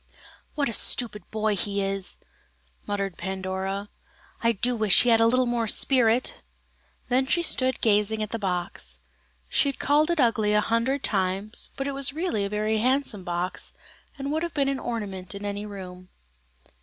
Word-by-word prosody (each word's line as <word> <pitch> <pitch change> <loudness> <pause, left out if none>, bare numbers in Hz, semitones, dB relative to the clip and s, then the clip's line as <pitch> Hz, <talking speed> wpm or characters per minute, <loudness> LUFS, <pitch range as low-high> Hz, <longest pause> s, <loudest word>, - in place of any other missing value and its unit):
"What 285 -2 +1
a 230 - -2
stupid 220 -1 +1
boy 215 -1 0
he 200 +1 -1
is!" 195 -1 -2 0.7
muttered 200 -3 -3
Pandora, 190 +2 -3 0.5
"I 230 - +3
do 245 +4 +1
wish 215 -4 +4
he 245 - +2
had 225 -1 +5
a 225 - +5
little 255 +2 +3
more 240 -2 0
spirit." 245 +1 +2 0.7
Then 260 +1 +1
she 345 +4 +2
stood 260 -5 +2
gazing 215 0 +2
at 215 - -6
the 230 - -3
box. 175 - -2 0.5
She 280 - +2
had 275 - -5
called 300 +3 +2
it 340 -2 +1
ugly 225 -4 +2
a - - +5
hundred 230 +6 0
times, 195 +2 +1
but 270 - -2
it - - -1
was 275 -1 +1
really 315 - -1
a 200 - -2
very 215 +1 0
handsome 255 -4 +1
box, 175 0 -3 0.4
and 275 0 -4
would 315 +1 0
have 340 0 -4
been 280 -2 +2
an 275 -1 -1
ornament 200 -5 -5
in 200 +1 -6
any 205 +1 -4
room. 185 -2 -9
215 Hz, 175 wpm, -26 LUFS, 195-255 Hz, 0.7 s, had